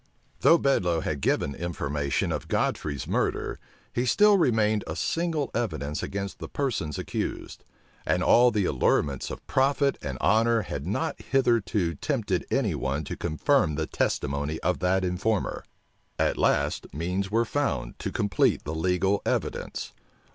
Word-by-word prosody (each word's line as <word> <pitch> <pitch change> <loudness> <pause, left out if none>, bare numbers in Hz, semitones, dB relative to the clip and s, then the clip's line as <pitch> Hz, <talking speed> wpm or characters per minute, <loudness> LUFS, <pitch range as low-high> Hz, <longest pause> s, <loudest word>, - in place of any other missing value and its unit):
Though 165 - +6
Bedloe 90 - +1
had 75 -3 -3
given 70 - +1
information 75 -3 -2
of - - -3
Godfrey's 70 -2 -1
murder, - - -1 0.3
he 120 +1 0
still 210 - +5
remained 110 - +2
a - - -4
single 165 -4 -1
evidence 80 -11 -2
against 100 0 -4
the - - -7
persons 120 - -2
accused; - - -4 0.4
and 90 - +1
all 120 +5 +6
the 105 -5 0
allurements 70 0 +1
of - - -8
profit 140 +1 +2
and 70 -2 -4
honor 115 0 +3
had 70 -4 -5
not 155 - -2
hitherto 115 -9 +1
tempted 110 - -2
any 115 -10 +1
one 70 0 -2
to - - -5
confirm 80 - +1
the 80 +1 -1
testimony 70 +1 -1
of 90 - 0
that 95 +1 +1
informer. 95 +4 -1 0.5
At - - +1
last, - - +1
means 90 +6 -2
were 115 +3 +2
found 140 - -2
to - - -3
complete 100 -2 +1
the 75 - -4
legal 90 +4 +1
evidence. - - -3
95 Hz, 145 wpm, -27 LUFS, 75-120 Hz, 0.5 s, Though